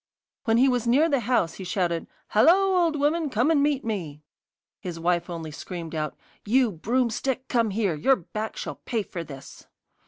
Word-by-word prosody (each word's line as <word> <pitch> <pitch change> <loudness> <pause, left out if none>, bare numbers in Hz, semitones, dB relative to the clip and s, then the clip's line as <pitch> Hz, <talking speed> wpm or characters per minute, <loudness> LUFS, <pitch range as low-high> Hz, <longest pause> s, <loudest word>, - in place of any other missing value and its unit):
When 225 -1 +3
he 260 +3 +5
was 245 -2 +1
near 280 +7 +4
the 280 -4 +2
house 230 -8 +1
he 190 - -8
shouted: 175 -3 -1 0.2
'Hallo, 375 - +5
old 320 -2 0
woman, 300 +2 +1
come 250 +6 +2
and 300 -3 +3
meet 285 -3 +1
me!' 165 -9 -4 0.6
His 175 -2 -6
wife 175 +1 0
only 165 -2 -5
screamed 165 +1 -7
out: 155 -1 -3 0.3
'You 245 +2 +3
broomstick, 245 +7 -1
come 230 -3 +1
here! 200 -3 0
Your 265 - +3
back 215 +2 -6
shall - - -5
pay 230 -4 -1
for 170 -3 -6
this. 140 -3 -11
220 Hz, 180 wpm, -25 LUFS, 170-265 Hz, 0.6 s, he